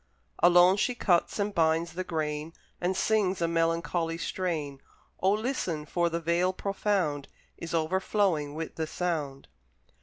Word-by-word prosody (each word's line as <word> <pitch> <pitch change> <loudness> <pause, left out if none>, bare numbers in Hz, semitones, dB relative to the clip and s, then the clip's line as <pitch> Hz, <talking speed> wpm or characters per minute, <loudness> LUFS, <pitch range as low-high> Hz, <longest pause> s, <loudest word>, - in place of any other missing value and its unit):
Alone 175 +2 +6
she 245 +4 0
cuts 175 -7 +1
and 205 0 -1
binds 165 0 +1
the 185 +2 -3
grain, 155 -1 -3 0.3
And 180 +1 0
sings 205 -4 +1
a 170 - +1
melancholy 165 0 0
strain; 160 -6 -3 0.4
O 190 - +3
listen! 210 - -2
for 170 +2 0
the 170 0 -2
Vale 170 +3 +1
profound 190 -7 -1 0.3
Is 170 0 -4
overflowing 165 -2 0
with 160 0 -6
the 160 -1 -2
sound. 155 -6 -3
170 Hz, 140 wpm, -28 LUFS, 160-185 Hz, 0.4 s, Alone